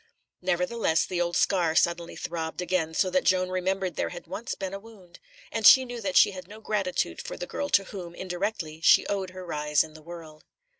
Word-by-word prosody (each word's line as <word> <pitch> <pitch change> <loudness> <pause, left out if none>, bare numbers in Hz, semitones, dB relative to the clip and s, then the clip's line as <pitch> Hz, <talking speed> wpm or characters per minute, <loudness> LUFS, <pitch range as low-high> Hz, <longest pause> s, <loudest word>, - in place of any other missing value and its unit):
Nevertheless 180 -1 +1
the 180 -1 -2
old 175 0 -1
scar 170 -5 +2
suddenly 170 0 +1
throbbed 160 -1 -5
again, 175 -3 -1
so 185 +2 +1
that 185 - +2
Joan 185 -1 +2
remembered 185 0 -2
there - - -1
had 175 - -9
once 205 +8 -5
been 190 -1 -5
a 195 - -5
wound; 200 -5 -16 0.3
and 225 - -3
she 260 +4 +9
knew 245 -1 -7
that 190 -3 0
she - - +7
had 185 -2 -9
no 210 +2 -11
gratitude 205 -4 -2
for - - -7
the - - -4
girl 285 - -4
to 200 - +4
whom, 180 -4 -8
indirectly, 180 -4 -4
she - - +6
owed 195 -2 -2
her 185 0 -9
rise 150 -3 +1
in 155 -1 -12
the 155 - -13
world. 160 -2 -11
185 Hz, 210 wpm, -27 LUFS, 170-195 Hz, 0.3 s, she